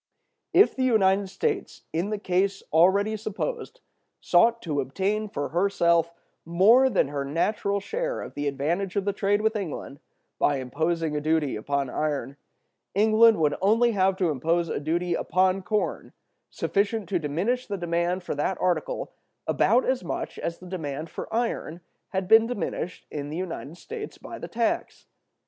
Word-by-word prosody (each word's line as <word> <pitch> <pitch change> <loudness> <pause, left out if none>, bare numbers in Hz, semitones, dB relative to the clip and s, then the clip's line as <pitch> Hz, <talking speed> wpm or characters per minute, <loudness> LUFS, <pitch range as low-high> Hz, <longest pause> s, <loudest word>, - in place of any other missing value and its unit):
"If 395 +4 +5
the 265 - -3
United 200 -5 +3
States, 425 - -3
in 170 +5 -1
the 215 - -1
case 195 0 0
already 195 +6 +4
supposed, 345 - -5 0.4
sought 230 +6 +4
to 150 -4 -1
obtain 200 +10 -1
for 145 -6 -3
herself 170 -2 +2 0.3
more 210 +11 +5
than 185 - +1
her 140 -1 -3
natural 200 +7 0
share - - -3
of - - -8
the 145 0 -3
advantage 170 +8 -1
of 200 -1 0
the 200 - 0
trade 200 +1 +1
with 220 +1 +1
England, 160 -7 -5 0.4
by 145 - +2
imposing 160 +4 -1
a 150 - -1
duty 155 -2 +1
upon 140 +5 -1
iron, 145 -2 -2 0.6
England 220 +2 +5
would 150 -2 +2
only 230 +5 +4
have 190 -2 +2
to 180 -4 +1
impose 165 +4 0
a - - -2
duty 170 +4 -1
upon 185 +2 +1
corn 210 +3 -2 0.4
sufficient 205 0 -1
to 185 -3 +1
diminish 180 - -1
the 200 - -3
demand 175 +1 -1
for - - -3
that 150 +6 -1
article 185 - -1 0.3
about - - +3
as - - 0
much - - -4
as 170 0 -3
the 185 - -13
demand 160 -4 -5
for - - -7
iron 225 -8 -2 0.3
had 190 -2 -2
been 225 +2 +6
diminished 200 -6 -4
in 145 -1 -5
the 155 - -5
United 170 -3 -5
States 435 - -7
by 345 - -9
the - - -6
tax. 230 -1 -2
185 Hz, 165 wpm, -26 LUFS, 160-215 Hz, 0.6 s, been